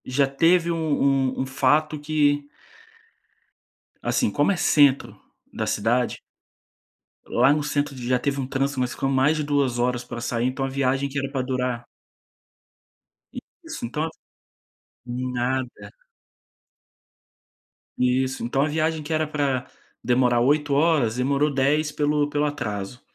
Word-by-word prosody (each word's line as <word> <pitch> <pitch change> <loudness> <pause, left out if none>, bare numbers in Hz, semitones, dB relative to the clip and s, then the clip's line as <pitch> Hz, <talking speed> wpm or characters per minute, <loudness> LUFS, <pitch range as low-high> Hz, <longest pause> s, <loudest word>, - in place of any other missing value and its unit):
Já 135 +2 +1
teve 165 +5 +3
um 165 - -1
um 140 -4 +1
um - - -1
fato 150 +3 +1
que 145 -1 +1 1.5
assim, - - +1
como 145 - +2
é - - +1
centro 145 -5 +3 0.3
da - - -3
cidade 120 +4 0 1.1
lá 130 +4 +3
no 150 - 0
centro 145 -1 -1
já 125 0 0
teve 140 +1 -2
um 130 - -3
trânsito, 135 +1 -1
nós 125 -1 -1
ficamos 135 0 -1
mais 150 +4 +3
de 155 - -1
2 140 -4 0
horas 125 0 0
pra 120 -1 -7
sair, 120 0 -1
então 130 +1 -2
a - - -3
viagem 135 0 0
que 140 +1 -3
era 135 0 -3
para 135 -2 -1
durar 125 -2 -2 1.8
Isso, - - -6
então 150 +7 -2 1.0
Nada. 125 -3 -3 2.1
Isso. 130 +1 0
Então 125 +3 0
a 145 - +2
viagem 155 +1 -1
que 155 +2 -4
era 155 0 0
pra 140 -4 -1 0.4
demorar 125 -1 +3
8 145 +3 +2
horas, 145 -6 +2
demorou 140 +3 +1
10 150 +3 +1
pelo 150 0 0
pelo 145 0 0
atraso. 105 -5 -4
135 Hz, 135 wpm, -24 LUFS, 125-150 Hz, 2.1 s, teve